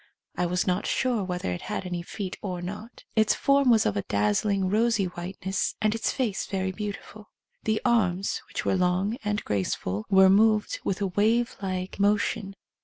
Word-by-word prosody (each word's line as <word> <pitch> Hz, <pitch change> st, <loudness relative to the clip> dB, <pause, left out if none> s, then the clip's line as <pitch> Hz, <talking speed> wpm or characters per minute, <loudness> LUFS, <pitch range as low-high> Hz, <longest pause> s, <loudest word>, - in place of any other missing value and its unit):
I 180 Hz, -, 0 dB
was 180 Hz, +1 st, 0 dB
not 185 Hz, +2 st, 0 dB
sure 245 Hz, -5 st, +1 dB
whether 180 Hz, -, -3 dB
it 90 Hz, -, -4 dB
had -, -, -4 dB
any 175 Hz, -1 st, -3 dB
feet 195 Hz, +1 st, -5 dB
or 185 Hz, -3 st, -4 dB
not. 205 Hz, +6 st, -8 dB
Its 220 Hz, -1 st, +4 dB
form 275 Hz, -2 st, +3 dB
was 225 Hz, -3 st, +5 dB
of 105 Hz, -, +1 dB
a 100 Hz, -, 0 dB
dazzling 105 Hz, -, +1 dB
rosy 220 Hz, +1 st, +2 dB
whiteness, 185 Hz, +2 st, -3 dB
and 215 Hz, 0 st, +2 dB
its 225 Hz, -, -1 dB
face 235 Hz, -7 st, -2 dB
very 190 Hz, -1 st, -1 dB
beautiful. 210 Hz, +1 st, -7 dB, 0.4 s
The 220 Hz, 0 st, +1 dB
arms, 200 Hz, -6 st, +1 dB
which -, -, -5 dB
were -, -, +2 dB
long 185 Hz, +4 st, +1 dB
and 210 Hz, 0 st, -2 dB
graceful, 100 Hz, 0 st, -2 dB
were 190 Hz, 0 st, +7 dB
moved 215 Hz, -, +3 dB
with 195 Hz, +1 st, -2 dB
a -, -, +2 dB
wave 220 Hz, +5 st, +1 dB
like 185 Hz, 0 st, -4 dB
motion. 200 Hz, -1 st, +1 dB
195 Hz, 180 wpm, -26 LUFS, 180-215 Hz, 0.4 s, were